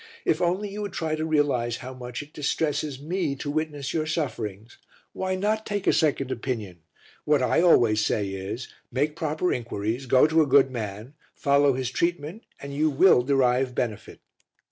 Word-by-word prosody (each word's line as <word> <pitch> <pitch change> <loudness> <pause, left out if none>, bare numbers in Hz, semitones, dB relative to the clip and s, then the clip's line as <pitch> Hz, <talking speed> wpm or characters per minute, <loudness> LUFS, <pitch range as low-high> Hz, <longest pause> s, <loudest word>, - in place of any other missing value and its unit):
If 160 - +1
only 180 +4 0
you 210 +1 -5
would 205 -2 -5
try 160 -1 -2
to 155 +1 -2
realize 135 -6 +1
how 130 +1 -8
much 125 +1 -6
it 145 - -19
distresses 150 -1 -1
me 160 -1 -2
to 145 +1 -4
witness 145 -2 -3
your 155 -1 -1
sufferings! 120 - -4 0.3
Why 185 0 -2
not 215 +3 0
take 205 -3 -3
a - - +4
second 140 -4 +1
opinion? 115 -8 -4 0.4
What 150 -3 +2
I 125 - +3
always 115 -11 +4
say 100 -1 0
is: 95 +5 -5 0.2
Make 145 +4 0
proper 160 +2 -1
inquiries, 120 +2 -3
go 130 +3 +5
to 160 +1 +3
a 150 - +2
good 135 0 +5
man, 110 +1 -6 0.2
follow 140 0 +3
his 130 -1 -3
treatment 170 - -2 0.2
and 140 0 -7
you 155 +2 +2
will 145 -1 +5
derive 130 -1 +1
benefit." 110 -4 -4
140 Hz, 175 wpm, -25 LUFS, 125-155 Hz, 0.4 s, go